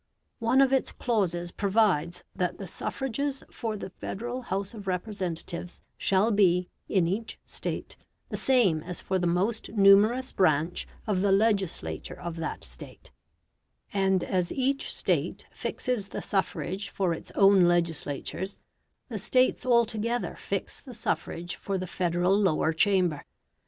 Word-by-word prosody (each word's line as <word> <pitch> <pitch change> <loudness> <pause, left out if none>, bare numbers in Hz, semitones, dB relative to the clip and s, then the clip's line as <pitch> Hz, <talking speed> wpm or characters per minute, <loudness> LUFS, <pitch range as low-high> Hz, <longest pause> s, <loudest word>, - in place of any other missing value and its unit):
One 240 +3 +4
of 270 0 +4
its 265 - +2
clauses 175 -8 -1
provides 190 -6 +1
that 180 -1 -1
the 195 - -6
suffrages 270 - -3
for 220 -3 -3
the 190 - -7
Federal 240 +7 -5
House 195 -3 -3
of 205 -3 -9
Representatives 180 -2 -3 0.2
shall 195 +4 +2
be, 180 -4 +3 0.2
in 185 -4 +3
each 210 +6 -3
State, - - -4 0.3
the - - -3
same 220 -12 +3
as 180 +2 -4
for 190 -1 -1
the 175 - +1
most 195 +6 0
numerous 215 +5 +5
branch 160 -1 +1 0.2
of 200 -4 0
the 200 0 +3
legislature 200 -3 0
of 170 -2 -5
that 165 0 -4
State; - - -10 0.8
and 190 -2 +2
as 180 -2 0
each 275 +1 0
State - - 0
fixes 245 -6 -2
the - - -6
suffrage 195 +1 -2
for 185 -4 0
its 165 - -7
own 195 -2 +6
legislatures, 170 +2 -1 0.5
the 225 -5 -4
States 255 +4 +2
altogether 235 0 +1
fix - - -4
the 255 -4 -10
suffrage 175 -5 -3
for 195 -1 -3
the 185 - -3
Federal 180 +1 +1
Lower 180 -5 +2
Chamber. 180 -3 +2
195 Hz, 140 wpm, -28 LUFS, 175-225 Hz, 0.8 s, own